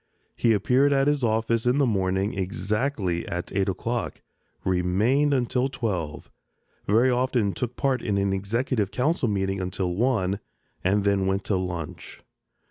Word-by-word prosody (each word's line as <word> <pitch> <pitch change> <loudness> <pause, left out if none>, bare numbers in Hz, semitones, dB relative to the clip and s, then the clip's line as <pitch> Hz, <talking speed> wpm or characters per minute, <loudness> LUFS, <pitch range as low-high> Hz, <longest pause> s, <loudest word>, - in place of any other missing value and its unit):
He 115 - +3
appeared 125 +7 +3
at 135 0 +3
his 145 -2 +1
office 115 +1 +1
in 125 +3 +3
the 145 - +4
morning 95 -2 0
exactly 95 0 -1
at 90 +1 -4
eight 100 0 +1
o'clock, 115 +5 -3 0.4
remained 100 +11 +2
until 125 -1 +1
twelve, 95 - -4 0.6
very 115 +5 +4
often 125 -5 +1
took 125 -1 -4
part 135 -2 0
in 100 -3 -1
an 100 0 +1
Executive 105 +2 -1
Council 130 +5 0
meeting 95 -2 -1
until 90 0 -2
one, 100 -3 +1 0.4
and 100 +2 +2
then 100 -1 +2
went 95 0 0
to 100 - 0
lunch. 90 -4 -5
105 Hz, 145 wpm, -25 LUFS, 95-125 Hz, 0.6 s, the